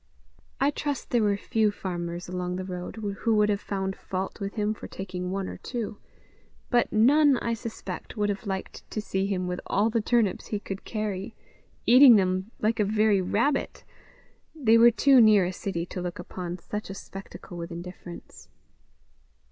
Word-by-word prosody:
I 275 +2 +3
trust 290 -2 -4
there 240 - +3
were 205 -2 +2
few 220 0 +1
farmers 175 -3 -5
along 180 0 -3
the 185 0 -4
road 180 -1 -6
who 215 +1 -1
would 210 0 +4
have 205 -1 0
found 190 -1 -3
fault 190 +3 -5
with 200 -1 -4
him 210 -1 0
for - - -9
taking 180 -1 -5
one 195 0 -2
or - - -7
two; 225 -4 -5 0.7
but 240 -1 +3
none, 275 +5 +5
I 235 0 -1
suspect, 230 +1 -7
would 205 -1 +1
have 205 +1 -3
liked 190 -1 -5
to - - -3
see 195 -2 -1
him 185 -2 -1
with 180 0 -3
all 215 +3 +2
the 230 0 +1
turnips 225 -3 +1
he 210 - -2
could 195 -1 -7
carry, 215 -1 -4 0.5
eating 255 0 +9
them 185 0 +1
like 220 +2 0
a - - +4
very 210 -1 +3
rabbit: 240 +10 0 0.7
they 235 -8 +4
were 230 +1 +8
too 260 +2 +5
near 210 -4 +6
a 180 - -3
city 175 -3 -3
to 180 - -6
look 175 -1 -4
upon 180 0 -6
such 210 +4 -6
a 195 - -6
spectacle 195 -1 -10
with 170 +1 -6
indifference. 175 0 -10
205 Hz, 180 wpm, -27 LUFS, 185-225 Hz, 0.7 s, eating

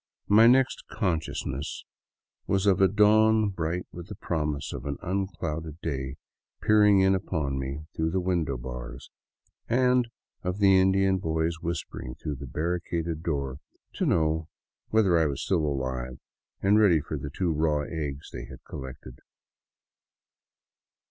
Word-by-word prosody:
My 110 +3 +7
next 130 +1 +3
consciousness 80 - -3 0.6
was 95 0 +1
of 95 -2 +4
a 95 - +7
dawn 110 +2 +4
bright 90 -1 -2
with 85 0 -9
the 105 - -7
promise 75 -6 -2
of - - -6
an 70 -1 -3
unclouded 85 -4 -3
day 65 -5 -3 0.4
peering 105 -2 +5
in 95 0 +4
upon 80 -8 -1
me 70 +3 -5
through 80 0 0
the 95 +3 0
window 85 -7 0
bars, 60 0 -8 0.6
and 125 0 +3 0.3
of 90 +1 -2
the 95 -2 +5
Indian 95 0 +3
boys 80 0 -1
whispering 80 -6 -4
through 75 -2 -5
the 70 +1 -8
barricaded 85 +1 -2
door 70 -5 -2 0.3
to - - -1
know 80 0 +1 0.4
whether 100 -6 +4
I 80 - +3
was 70 -3 -3
still 85 -5 +1
alive 65 -2 -3 0.5
and 100 +2 +5
ready 95 -7 +5
for - - -5
the 70 - -5
two 85 +4 -1
raw 75 -1 +1
eggs 75 -3 -5
they - - -6
had 65 -2 -12
collected. 65 -1 -9
85 Hz, 140 wpm, -27 LUFS, 70-95 Hz, 0.6 s, My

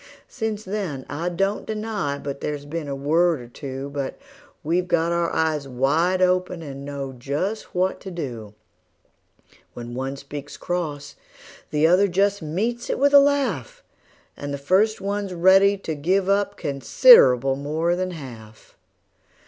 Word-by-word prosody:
Since 220 -3 -4
then 185 -10 -4
I 160 +5 -2
don't 195 +4 -1
deny 215 -9 -3
but 140 -1 -6
there's 145 -1 -4
been 155 +1 -5
a 140 - -3
word 160 +3 +2
or 120 - -10
two; 135 +3 -7
But 140 -2 -4 0.5
we've 175 +4 0
got 170 -1 +1
our 170 0 0
eyes 155 -3 0
wide 155 +9 +1
open, 180 -1 0
and 140 -2 -8
know 140 -1 -5
just 145 - -4
what 185 +1 0
to 195 - -7
do: 120 - -6 1.2
When 120 0 -7
one 135 +2 -3
speaks 140 +1 -9
cross 150 -5 -4 0.5
the 150 +1 +2
other 180 +5 +5
just 200 +2 +1
meets 220 +10 -3
it - - 0
with 285 +2 +3
a 285 - +10
laugh, 285 - 0 0.5
And 145 0 -6
the 140 - -3
first 190 +10 +2
one's 200 -1 -3
ready 195 +3 +5
to 165 -4 -5
give 185 +6 0
up 200 +1 +1
considerable 135 - +5
more 155 +5 -1
than 185 +1 -2
half. 120 -10 -11
165 Hz, 150 wpm, -23 LUFS, 140-195 Hz, 1.2 s, a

